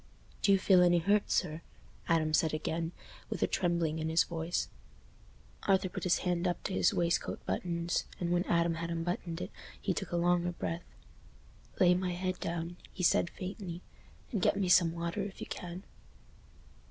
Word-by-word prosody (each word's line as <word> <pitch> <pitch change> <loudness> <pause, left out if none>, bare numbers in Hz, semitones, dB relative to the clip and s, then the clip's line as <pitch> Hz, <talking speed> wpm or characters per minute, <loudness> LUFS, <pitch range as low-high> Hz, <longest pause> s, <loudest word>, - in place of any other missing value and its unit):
"Do 200 - +4
you 195 - +7
feel 185 -1 +5
any 175 -1 +5
hurt, 200 +5 +2
sir?" 160 -2 0 0.5
Adam 160 -2 +2
said 155 0 +3
again, 165 +1 -2 0.4
with - - -1
a - - +6
trembling 170 -3 0
in 160 0 -1
his 160 +1 +4
voice. 165 0 -2 1.0
Arthur 190 -1 +3
put - - -5
his 180 - +4
hand 175 0 +1
up 175 - -2
to - - -3
his 95 -2 +4
waistcoat 170 0 0
buttons, 170 -1 -1
and 175 -1 -1
when 175 0 +3
Adam 170 0 +2
had 165 +1 -4
unbuttoned 170 0 -3
it, 180 - -5 0.3
he 190 - 0
took 195 +1 -4
a 175 - 0
longer 175 0 +2
breath. 170 0 -4 0.9
"Lay 180 -1 +6
my 180 0 0
head 185 +1 -2
down," 170 +1 -3
he 185 - -5
said, 175 - +4
faintly, 185 -2 -6 0.5
"and 210 -7 -1
get 195 - +3
me 190 -3 0
some 175 -2 +6
water 170 +3 -3
if 195 0 -6
you - - -5
can." 180 +1 -6
175 Hz, 175 wpm, -32 LUFS, 165-180 Hz, 1.0 s, you